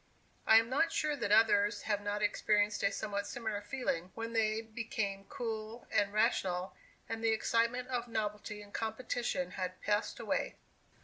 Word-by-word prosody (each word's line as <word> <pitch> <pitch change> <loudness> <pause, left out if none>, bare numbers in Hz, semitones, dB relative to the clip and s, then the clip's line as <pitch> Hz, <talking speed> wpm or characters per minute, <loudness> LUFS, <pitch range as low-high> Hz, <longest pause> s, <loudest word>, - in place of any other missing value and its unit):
I 220 - +9
am 225 0 +4
not 280 +7 +2
sure 300 -1 +1
that 235 -7 -2
others 210 -1 +4
have 205 -1 0
not 205 +1 -2
experienced 205 0 +2
a 200 - +3
somewhat 200 -1 -3
similar 220 -2 -3
feeling, 205 -6 -2
when 230 0 -4
they 220 -1 +2
became 220 -3 -3
cool 230 -4 -5
and 200 0 +2
rational, 185 -3 +1 0.3
and 225 0 -4
the 225 - +4
excitement 235 +3 +1
of 245 -2 -1
novelty 210 -2 -3
and 205 - -16
competition 225 -4 -2
had 185 -1 -4
passed 210 +1 0
away. - - -1
215 Hz, 160 wpm, -34 LUFS, 205-230 Hz, 0.3 s, I